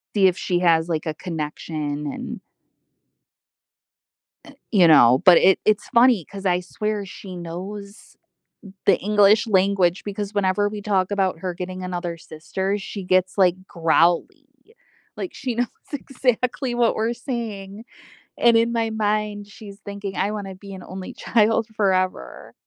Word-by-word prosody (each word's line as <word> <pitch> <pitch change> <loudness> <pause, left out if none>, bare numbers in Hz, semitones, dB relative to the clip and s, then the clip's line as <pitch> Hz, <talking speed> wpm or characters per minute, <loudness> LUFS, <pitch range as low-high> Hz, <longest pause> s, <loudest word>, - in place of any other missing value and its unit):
See 195 -2 +5
if 185 -1 0
she 175 -1 -1
has, 165 -2 +3
like, 160 -2 -2
a 155 - -2
connection 150 -3 -5
and - - -6 2.1
Eh, - - -13 0.2
you 185 -6 +5
know, 125 -4 +6
but 180 -2 +9
it 190 0 +4
it's 215 -1 +2
funny 235 - +4
'cause 200 -1 -10
I 180 -1 +2
swear 210 +2 -3
she 185 0 -10
knows 195 +5 -8 0.7
the - - +5
English 210 +1 +4
language 190 -2 +2
because 205 0 -5
whenever 205 0 +1
we 210 0 -6
talk 195 -2 0
about 190 -4 0
her 180 0 -3
getting 185 +1 -6
another 175 -2 -4
sister, 190 +5 -4
she 200 0 -7
gets, 185 +1 +1
like, 180 -3 +4
growly, 170 - +1 0.7
like 370 - -5
she 255 -4 -4
knows 245 +1 0 0.2
exactly 255 -2 -1
what 240 -1 +2
we're 225 +2 0
saying, 225 -4 -6 0.5
and 235 -1 +5
in 230 +1 +2
my 230 -1 0
mind, 210 -1 -1
she's 205 -1 -12
thinking, 200 -1 -7
"I 200 - 0
wanna 200 -3 -6
be 195 +1 -11
an 190 - -9
only 185 0 -8
child 225 -1 +2
forever." 185 - -1
195 Hz, 150 wpm, -22 LUFS, 180-215 Hz, 2.1 s, but